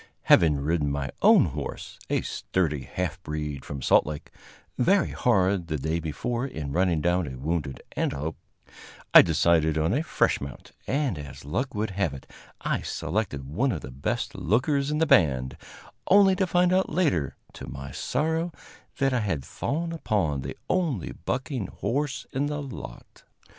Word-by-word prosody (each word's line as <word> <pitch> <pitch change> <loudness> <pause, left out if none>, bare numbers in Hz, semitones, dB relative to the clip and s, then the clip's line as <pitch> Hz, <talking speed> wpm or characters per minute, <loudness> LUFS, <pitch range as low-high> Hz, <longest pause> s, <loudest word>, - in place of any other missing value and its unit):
Having 75 -4 +5
ridden 75 -1 0
my 70 -1 -2
own - - +7
horse, - - -6
a - - +1
sturdy 75 -8 -1
half 90 -1 -3
breed 75 -4 -4
from 70 -3 -6
Salt - - +5
Lake, 75 -1 -6 0.4
very 190 +7 +3
hard 95 -6 +2
the 80 -2 -1
day 80 +4 -1
before 115 - -2
in 75 - -5
running 85 -1 +2
down 85 0 +1
a 65 -1 -6
wounded 75 -1 -3
antelope, 75 +4 -2 0.8
I - - +12
decided 80 -1 +3
on 80 +3 +1
a 140 - +2
fresh - - +1
mount; 70 0 -8 0.2
and, 135 - 0
as 70 -2 -9
luck 125 - -2
would 105 0 -1
have 95 -7 -1
it, 65 - -10 0.4
I - - -1
selected 85 -5 -2
one 110 - 0
of - - -3
the - - -8
best 65 +3 -2
lookers 140 - +1
in 150 - 0
the 160 - +3
band, 65 - +3 0.5
only 195 -1 +6
to 190 - +1
find 180 +1 +3
out 190 +1 +2
later, 150 - +1 0.2
to 65 - -9
my 65 +2 -7
sorrow, 160 - -1 0.5
that 135 -1 +2
I 125 - +2
had 85 - -2
fallen 165 +4 -3
upon 95 - 0
the - - -6
only 160 - 0
bucking 125 - -3
horse 135 +9 -2
in 140 +2 0
the 150 0 -3
lot. 135 -4 -9
90 Hz, 165 wpm, -26 LUFS, -, 0.8 s, I